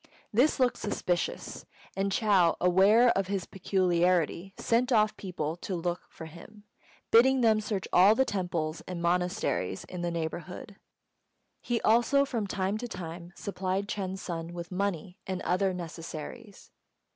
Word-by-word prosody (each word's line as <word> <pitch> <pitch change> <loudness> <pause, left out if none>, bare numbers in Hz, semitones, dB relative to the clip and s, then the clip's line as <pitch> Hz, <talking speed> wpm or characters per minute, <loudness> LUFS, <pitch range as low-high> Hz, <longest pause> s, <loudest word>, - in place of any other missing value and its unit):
This 260 +7 +3
looked 250 -1 +2
suspicious, 180 -4 -2 0.3
and 195 0 0
Chou, 195 -5 +3
aware 195 +7 +5
of 195 -4 +1
his 195 -2 -2
peculiarity, 180 -1 +1
sent 245 +3 +1
off 215 -2 +3
people 165 -5 -4
to 185 +1 -4
look 175 +1 -2
for 160 - -10
him, 175 +6 -13 0.5
bidding 260 +3 +6
them 220 -2 +4
search 205 -3 -3
all 195 +4 +7
the 265 - +3
temples 170 -6 -2
and 180 -1 -5
monasteries 170 - -1
in 180 -1 -7
the 175 - -1
neighbourhood. 170 +4 -5 0.8
He 240 -1 -1
also 240 +5 +4
from 230 -6 -2
time 195 +2 -1
to 245 - -4
time 170 -3 -7
supplied 195 0 -3
Ch'êng's 190 -3 -4
son 170 -1 -5
with 170 +1 -7
money 185 -2 -3
and 190 -1 -2
other 190 +2 +1
necessaries. 175 +4 -8
190 Hz, 145 wpm, -29 LUFS, 175-215 Hz, 0.8 s, all